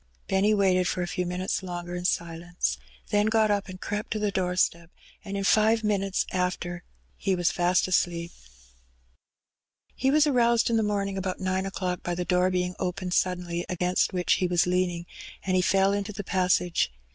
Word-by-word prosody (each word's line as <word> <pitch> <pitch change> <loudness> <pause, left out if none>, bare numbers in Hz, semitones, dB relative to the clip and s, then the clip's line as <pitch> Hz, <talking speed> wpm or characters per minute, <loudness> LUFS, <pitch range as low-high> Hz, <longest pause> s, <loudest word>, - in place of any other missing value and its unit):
Benny 195 +2 +2
waited 185 -2 +3
for 180 - -1
a - - -3
few 180 0 -2
minutes 180 +1 -2
longer 175 -1 -5
in 180 0 -5
silence, 170 - -1 0.3
then 205 +1 +3
got 220 -1 +3
up 205 -1 0
and 185 0 -8
crept 210 +2 -4
to - - -2
the 210 -1 0
doorstep, 180 -3 0 0.3
and 200 0 -5
in 195 - -2
five 220 +2 +3
minutes 195 -2 0
after 180 -1 -2 0.3
he 195 -2 0
was 175 -1 +1
fast 180 +1 +2
asleep. 170 -2 0 1.6
He 265 - 0
was 300 +2 +5
aroused 235 -4 +3
in 230 - +3
the - - +3
morning 200 -2 -1
about 185 -1 -3
nine 190 0 -1
o'clock 185 -2 -3
by 175 - -3
the 180 0 -3
door 180 0 +2
being 180 0 -1
opened 180 0 -3
suddenly, 180 -2 0
against 180 0 +1
which 180 -1 +1
he 180 - +2
was 175 -1 +2
lean 180 0 +1
ing, 170 -1 -6 0.4
and 185 -1 +1
he 185 - +4
fell 195 +2 +3
into 205 +1 -3
the 205 0 -5
passage. 180 - +1
185 Hz, 185 wpm, -27 LUFS, 180-200 Hz, 1.6 s, was